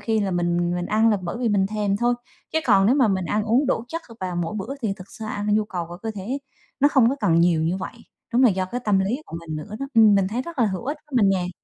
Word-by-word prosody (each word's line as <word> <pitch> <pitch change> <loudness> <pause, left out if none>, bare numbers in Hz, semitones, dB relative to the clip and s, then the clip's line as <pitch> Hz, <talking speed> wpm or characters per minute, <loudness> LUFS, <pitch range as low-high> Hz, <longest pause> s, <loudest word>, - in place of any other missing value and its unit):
khi 220 -2 0
là 200 - -1
mình 175 0 0
mình 175 0 -2
ăn 220 +1 +3
là 210 - +3
bởi 175 +5 -4
vì 245 -2 0
mình 200 -2 +2
thèm 205 -1 -1
thôi, 240 +2 +2 0.4
chứ 320 - +2
còn 195 0 +5
nếu 250 - +4
mà 260 -6 +4
mình 190 -2 0
ăn 210 +4 0
uống 245 +6 +2
đủ 240 -3 0
chất 330 +4 -4 0.2
và 180 -1 -3
mỗi 175 +4 -2
bữa 240 +8 -5
thì 215 - 0
thực 185 -1 -12
ra 220 -1 -7
an 205 0 -1
nhu 215 0 +2
cầu 180 -5 -4
của 175 - -8
cơ 225 - -2
thể 210 +8 -4 0.4
nó 285 - +6
không 265 -6 +4
có 275 - -2
cần 170 -5 +3
nhiều 170 -2 +3
như 170 +3 0
vậy. 190 - -5 0.4
Đúng 245 - +4
là 250 - +7
do 190 -1 -1
cái 240 +7 -4
tâm 205 -2 +3
lý 230 +10 -1
của 165 - -7
mình 155 -2 -6
nữa 205 +8 -7
đó, 275 - -2
ừm, 220 -2 +7
mình 195 -1 +2
thấy 235 +5 -2
rất 335 -1 -9
là 235 - +4
hữu 190 0 -3
ích 290 +3 -2
với 290 - -11
mình 200 - +5
nè. 180 -1 -2
205 Hz, 305 wpm, -23 LUFS, 185-235 Hz, 0.4 s, là